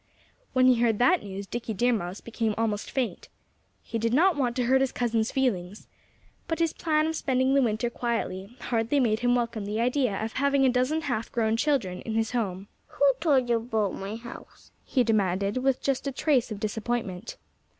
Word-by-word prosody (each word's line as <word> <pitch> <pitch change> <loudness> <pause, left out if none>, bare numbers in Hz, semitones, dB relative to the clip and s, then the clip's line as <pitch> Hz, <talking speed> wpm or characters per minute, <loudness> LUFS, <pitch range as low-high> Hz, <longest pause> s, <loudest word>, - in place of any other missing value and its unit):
When 255 0 +4
he 250 -2 +5
heard 225 -3 +3
that 325 - +4
news 200 0 -6
Dickie 230 +1 -4
Deer 245 +5 +2
Mouse 185 -3 -4
became 225 -2 -2
almost 215 -2 -1
faint. 260 -3 -3 0.5
He 230 - -4
did 230 +2 +1
not 355 +4 +4
want 250 -4 0
to 255 - 0
hurt 265 +2 +3
his 270 - +1
cousins' 230 -2 0
feelings. 210 -7 -1 0.6
But 325 -1 -1
his 330 -2 +1
plan 310 -1 +1
of 320 0 -1
spending 260 -2 +1
the 275 - +4
winter 225 -1 0
quietly 230 -3 -3
hardly 235 +4 0
made 220 -4 +2
him 245 0 +2
welcome 235 -3 -1
the 210 +2 -2
idea 250 -2 +1
of 225 - -6
having 280 0 +2
a - - +5
dozen 255 +6 +1
half 245 -7 -3
grown 220 -1 +1
children 230 -9 0
in 225 - -4
his 225 -1 0
home. 195 -5 -2 0.2
"Who 280 -1 +3
told 280 -6 +2
you 235 -1 +3
about 220 -4 -1
my 195 +3 -5
house?" 235 +1 -12
he 255 - +1
demanded 200 -2 +1
with 260 0 0
just 275 0 -1
a - - 0
trace 265 -2 +1
of 210 - -5
disappointment. 215 -2 -3
235 Hz, 195 wpm, -27 LUFS, 215-265 Hz, 0.6 s, he